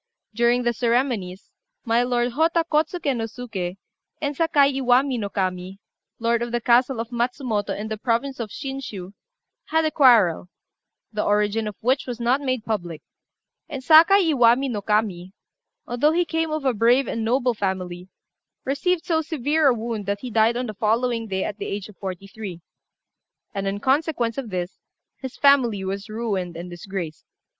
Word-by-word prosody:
During 240 Hz, +2 st, +2 dB
the 240 Hz, 0 st, +1 dB
ceremonies, 235 Hz, -5 st, -1 dB, 0.3 s
my 230 Hz, +1 st, +3 dB
lord 245 Hz, 0 st, 0 dB
Hotta 330 Hz, +5 st, +2 dB
Kôtsuké 305 Hz, -2 st, +1 dB
no 225 Hz, -1 st, -2 dB
Suké 215 Hz, -6 st, -5 dB, 0.4 s
and 290 Hz, -1 st, -2 dB
Sakai 290 Hz, -3 st, +3 dB
Iwami 260 Hz, 0 st, +2 dB
no 205 Hz, -2 st, -3 dB
Kami, 185 Hz, 0 st, -3 dB, 0.4 s
lord 235 Hz, 0 st, +1 dB
of 240 Hz, 0 st, -3 dB
the 240 Hz, -, 0 dB
castle 245 Hz, +1 st, +3 dB
of 230 Hz, +1 st, -4 dB
Matsumoto, 240 Hz, -3 st, -2 dB
in 215 Hz, -, -4 dB
the 220 Hz, -1 st, -5 dB
province 250 Hz, +3 st, -1 dB
of 230 Hz, -3 st, -4 dB
Shinshiu, 225 Hz, -8 st, -6 dB, 0.5 s
had 320 Hz, 0 st, +1 dB
a 310 Hz, -, +1 dB
quarrel, 225 Hz, -, +4 dB, 0.6 s
the 210 Hz, -, -1 dB
origin 210 Hz, +1 st, +1 dB
of 210 Hz, -, -5 dB
which 260 Hz, +4 st, +1 dB
was 245 Hz, -2 st, -5 dB
not 245 Hz, +4 st, +1 dB
made 255 Hz, -5 st, -2 dB
public; 175 Hz, -8 st, -4 dB, 0.7 s
and 270 Hz, -2 st, -6 dB
Sakai 330 Hz, +4 st, +6 dB
Iwami 245 Hz, +1 st, +4 dB
no 210 Hz, -3 st, -3 dB
Kami, 200 Hz, -3 st, -1 dB, 0.5 s
although 260 Hz, +6 st, +1 dB
he 350 Hz, +1 st, +2 dB
came 325 Hz, -1 st, -1 dB
of 310 Hz, -2 st, -3 dB
a 260 Hz, -, +3 dB
brave 240 Hz, +5 st, +3 dB
and 225 Hz, -, -2 dB
noble 245 Hz, +2 st, +1 dB
family, 185 Hz, -3 st, -4 dB, 0.6 s
received 325 Hz, +6 st, 0 dB
so 325 Hz, -3 st, +1 dB
severe 300 Hz, 0 st, +1 dB
a 260 Hz, -, +5 dB
wound 220 Hz, -3 st, -4 dB
that 200 Hz, 0 st, -2 dB
he 250 Hz, -, -6 dB
died 225 Hz, +2 st, +3 dB
on 250 Hz, -, -2 dB
the 215 Hz, -, -5 dB
following 230 Hz, +2 st, 0 dB
day, 190 Hz, -2 st, -2 dB
at 205 Hz, -, -5 dB
the -, -, -4 dB
age 200 Hz, -1 st, -4 dB
of 210 Hz, -, -15 dB
forty 190 Hz, -1 st, -6 dB
three; 195 Hz, -4 st, -8 dB, 0.9 s
and 195 Hz, -1 st, -3 dB
in 195 Hz, +1 st, -2 dB
consequence 265 Hz, -2 st, 0 dB
of 250 Hz, -5 st, -6 dB
this, 180 Hz, -1 st, -4 dB, 0.4 s
his 265 Hz, -2 st, -7 dB
family 250 Hz, -8 st, +4 dB
was 195 Hz, +3 st, -4 dB
ruined 200 Hz, -6 st, -3 dB
and 175 Hz, +1 st, -7 dB
disgraced. 175 Hz, -2 st, -6 dB
235 Hz, 170 wpm, -23 LUFS, 205-265 Hz, 0.9 s, Sakai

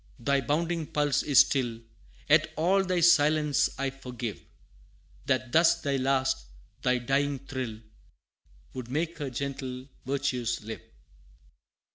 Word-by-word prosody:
thy 140 Hz, +3 st, +1 dB
bounding 165 Hz, +4 st, -1 dB
pulse 145 Hz, -2 st, +1 dB
is 145 Hz, -3 st, +6 dB
still, 120 Hz, -5 st, 0 dB, 0.5 s
Yet -, -, +4 dB
all 185 Hz, +5 st, +2 dB
thy 180 Hz, -2 st, 0 dB
silence 155 Hz, -3 st, +4 dB
I 135 Hz, 0 st, -1 dB
forgive, 125 Hz, -4 st, -6 dB, 0.9 s
That 130 Hz, -2 st, 0 dB
thus 165 Hz, +2 st, +4 dB
thy 140 Hz, -1 st, 0 dB
last 130 Hz, -, 0 dB, 0.3 s
thy 125 Hz, 0 st, +2 dB
dying 135 Hz, +3 st, 0 dB
thrill, 125 Hz, -4 st, -6 dB, 0.9 s
Would 125 Hz, -2 st, -7 dB
make 160 Hz, +5 st, -2 dB
Her 145 Hz, -2 st, -3 dB
gentle 130 Hz, 0 st, -5 dB, 0.2 s
virtues 130 Hz, -4 st, -1 dB
live! 110 Hz, +1 st, -7 dB
135 Hz, 120 wpm, -28 LUFS, 125-150 Hz, 0.9 s, is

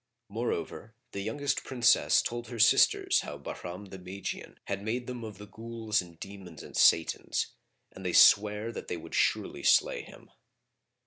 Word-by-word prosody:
Moreover 110 Hz, 0 st, -4 dB, 0.2 s
the 100 Hz, -, -5 dB
youngest 135 Hz, +7 st, -2 dB
Princess 120 Hz, -3 st, +3 dB
told 120 Hz, 0 st, -4 dB
her 120 Hz, -, -7 dB
sisters 110 Hz, -, +4 dB
how 75 Hz, -, -6 dB
Bahram 90 Hz, +6 st, -8 dB
the 95 Hz, -, -8 dB
Magian 95 Hz, +2 st, -7 dB
had 100 Hz, 0 st, -4 dB
made 120 Hz, +4 st, -3 dB
them 125 Hz, -2 st, -6 dB
of 110 Hz, -3 st, -8 dB
the 105 Hz, -, -10 dB
Ghuls 110 Hz, 0 st, -2 dB
and 85 Hz, -2 st, -14 dB
Demons 95 Hz, -5 st, -10 dB
and -, -, -12 dB
Satans,[FN#43] 80 Hz, -, 0 dB
and -, -, -10 dB
they -, -, -2 dB
sware 105 Hz, +2 st, +5 dB
that -, -, -8 dB
they 90 Hz, -, -3 dB
would 80 Hz, -, -11 dB
surely -, -, 0 dB
slay -, -, +3 dB
him. -, -, -15 dB
105 Hz, 165 wpm, -29 LUFS, 95-115 Hz, 0.2 s, sware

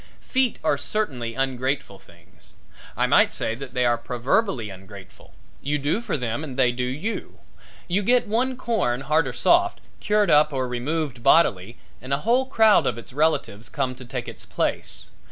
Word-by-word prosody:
Feet 260 Hz, -3 st, 0 dB
are -, -, +1 dB
certainly 125 Hz, -, -3 dB
ungrateful 130 Hz, -5 st, -2 dB
things. -, -, -17 dB, 0.4 s
I -, -, +3 dB
might -, -, +4 dB
say 110 Hz, -, -1 dB
that 130 Hz, +2 st, -9 dB
they 125 Hz, -1 st, +2 dB
are 120 Hz, -1 st, +2 dB
proverbially 125 Hz, -, -1 dB
ungrateful. 95 Hz, 0 st, -13 dB, 0.3 s
You 145 Hz, +1 st, -1 dB
do 145 Hz, +10 st, -1 dB
for 235 Hz, -, -2 dB
them 125 Hz, +3 st, -3 dB
and 135 Hz, -4 st, -7 dB
they 125 Hz, -2 st, +4 dB
do 125 Hz, +1 st, -4 dB
you. 150 Hz, -, -4 dB, 0.5 s
You 185 Hz, +3 st, +1 dB
get 245 Hz, +4 st, +3 dB
one 250 Hz, +4 st, 0 dB
corn, 180 Hz, -, -1 dB
hard 150 Hz, +1 st, +1 dB
or 130 Hz, -, -4 dB
soft, 345 Hz, -, +3 dB, 0.2 s
cured 210 Hz, -1 st, +2 dB
up 150 Hz, +1 st, +5 dB
or 130 Hz, -2 st, -1 dB
removed 130 Hz, +1 st, -3 dB
bodily 115 Hz, -, +3 dB, 0.2 s
and 130 Hz, +2 st, -4 dB
a 145 Hz, -, -8 dB
whole 250 Hz, +3 st, +3 dB
crowd 220 Hz, -5 st, +4 dB
of -, -, -1 dB
its 115 Hz, -, -11 dB
relatives 130 Hz, -8 st, 0 dB
come 130 Hz, -2 st, -2 dB
to 130 Hz, +1 st, -11 dB
take 120 Hz, -, -5 dB
its -, -, -8 dB
place. -, -, -3 dB
135 Hz, 175 wpm, -24 LUFS, 120-205 Hz, 0.5 s, up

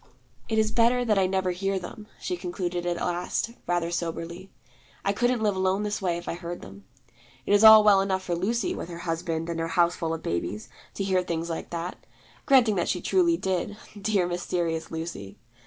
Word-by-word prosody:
'It 220 Hz, -, 0 dB
is 215 Hz, 0 st, +2 dB
better 240 Hz, +2 st, +3 dB
that 210 Hz, -4 st, +3 dB
I 190 Hz, -, +3 dB
never 190 Hz, -1 st, 0 dB
hear 195 Hz, +2 st, -1 dB
them,' 200 Hz, +4 st, -8 dB
she 180 Hz, -, -3 dB
concluded 175 Hz, 0 st, -3 dB
at 175 Hz, -, 0 dB
last, 175 Hz, +6 st, -2 dB, 0.2 s
rather 175 Hz, -1 st, 0 dB
soberly. 170 Hz, +2 st, -4 dB, 0.6 s
'I 200 Hz, -, +2 dB
couldn't 240 Hz, +1 st, +1 dB
live 205 Hz, -2 st, +2 dB
alone 190 Hz, +2 st, +1 dB
this 210 Hz, 0 st, -2 dB
way 175 Hz, -3 st, 0 dB
if 175 Hz, -, -9 dB
I -, -, -1 dB
heard 175 Hz, 0 st, -6 dB
them. 95 Hz, 0 st, -12 dB, 0.6 s
It -, -, +1 dB
is 205 Hz, +1 st, +5 dB
all 220 Hz, -1 st, +10 dB
well 200 Hz, -2 st, +6 dB
enough 190 Hz, -1 st, -1 dB
for 175 Hz, -, -2 dB
Lucy, 200 Hz, +6 st, 0 dB
with -, -, -6 dB
her 170 Hz, -, -7 dB
husband 165 Hz, -1 st, -2 dB
and 170 Hz, -1 st, -3 dB
her 165 Hz, -, -1 dB
houseful 170 Hz, -1 st, +1 dB
of 165 Hz, -, -9 dB
babies, 105 Hz, +5 st, -3 dB, 0.3 s
to 195 Hz, -, -2 dB
hear 190 Hz, -1 st, +2 dB
things 170 Hz, -1 st, -3 dB
like 165 Hz, -, -5 dB
that; 170 Hz, +1 st, -5 dB, 0.4 s
granting 240 Hz, -7 st, +5 dB
that 175 Hz, -, 0 dB
she 180 Hz, -, 0 dB
truly 340 Hz, -, +2 dB
did, 190 Hz, -, -2 dB, 0.2 s
dear 195 Hz, -3 st, +2 dB
mysterious 175 Hz, -2 st, -2 dB
Lucy! 160 Hz, -12 st, -6 dB
180 Hz, 200 wpm, -26 LUFS, 170-205 Hz, 0.6 s, all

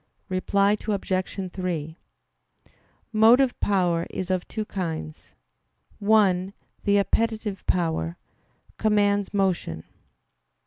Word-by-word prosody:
Reply 200 Hz, +2 st, +2 dB
Obj. 190 Hz, -2 st, -2 dB
3: 165 Hz, -4 st, -3 dB, 1.2 s
Motive 240 Hz, +4 st, +5 dB
power 175 Hz, -4 st, +1 dB
is 185 Hz, 0 st, -4 dB
of 185 Hz, -1 st, -1 dB
two 215 Hz, -1 st, -4 dB
kinds. 165 Hz, -5 st, -5 dB, 0.6 s
One, 200 Hz, -3 st, +3 dB, 0.3 s
the 205 Hz, 0 st, +4 dB
appetitive 215 Hz, 0 st, 0 dB
power, 160 Hz, -, 0 dB, 0.6 s
commands 205 Hz, -2 st, +2 dB
motion. 180 Hz, -, -1 dB
190 Hz, 85 wpm, -25 LUFS, 180-205 Hz, 1.2 s, Motive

